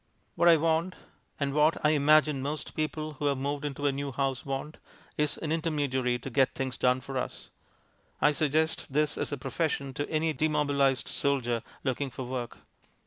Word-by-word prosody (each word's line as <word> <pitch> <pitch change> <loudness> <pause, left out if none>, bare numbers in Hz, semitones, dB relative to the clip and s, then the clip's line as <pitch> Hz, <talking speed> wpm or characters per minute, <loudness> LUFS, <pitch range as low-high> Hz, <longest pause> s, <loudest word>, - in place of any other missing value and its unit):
What 170 - +4
I 165 - +8
want, 165 +3 +1 0.4
and 140 -1 0
what, 150 +2 +4
I 150 - +6
imagine, 150 -1 +4
most 145 +3 -4
people 155 0 -3
who 145 - 0
have 140 -1 +1
moved 140 +2 -2
into 145 0 -3
a 140 - +4
new 140 0 -3
house 135 0 -1
want, 135 +3 -4 0.4
is 150 -1 0
an 155 - -4
intermediary 145 -6 0
to 125 - -7
get 135 +1 +2
things 130 -1 -2
done 125 +1 +2
for 135 0 -3
us. - - -6 0.7
I 150 - +5
suggest 155 +1 0
this 150 +1 +1
as - - -3
a 145 - -2
profession 140 -1 -2
to 145 +1 -3
any 160 0 +1
demobilized 145 -4 +1
soldier 125 -5 0 0.2
looking 135 +1 -1
for 130 - -6
work. 125 -1 -4
145 Hz, 180 wpm, -29 LUFS, 135-155 Hz, 0.7 s, I